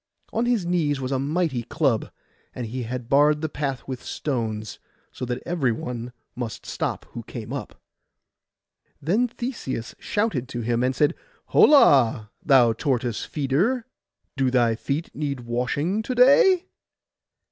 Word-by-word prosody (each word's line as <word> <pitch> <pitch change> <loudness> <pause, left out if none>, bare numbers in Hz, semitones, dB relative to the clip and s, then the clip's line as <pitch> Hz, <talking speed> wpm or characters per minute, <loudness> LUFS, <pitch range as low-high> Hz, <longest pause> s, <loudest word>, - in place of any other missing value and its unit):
On 230 +2 +1
his 235 -7 +1
knees 160 -5 +1
was 130 0 -3
a 135 - +1
mighty 145 -2 0
club; 135 -2 0 0.5
and 125 - -4
he 125 +3 -4
had 120 0 -5
barred 150 +2 +4
the 160 - 0
path 140 -3 -4
with 130 -2 -5
stones, 110 -6 -3 0.3
so - - -5
that 125 0 -4
every 165 -8 +1
one 120 +1 -5 0.2
must 120 -3 -5
stop - - -3
who - - -6
came - - -7
up. - - -6 1.2
Then 205 - +1
Theseus 230 - -5
shouted 175 - -1
to 120 - -4
him, 120 +1 0
and 130 +1 +1
said, 150 +4 +3 0.4
'Holla, 125 - +5
thou 125 -5 +5
tortoise 120 -2 -1
feeder, 170 - 0 0.5
do 135 -2 +2
thy 120 -2 +3
feet 140 +8 -3
need 140 -3 -3
washing 125 - -1
to 255 +3 -4
day? 310 +9 +6
135 Hz, 145 wpm, -24 LUFS, 120-170 Hz, 1.2 s, day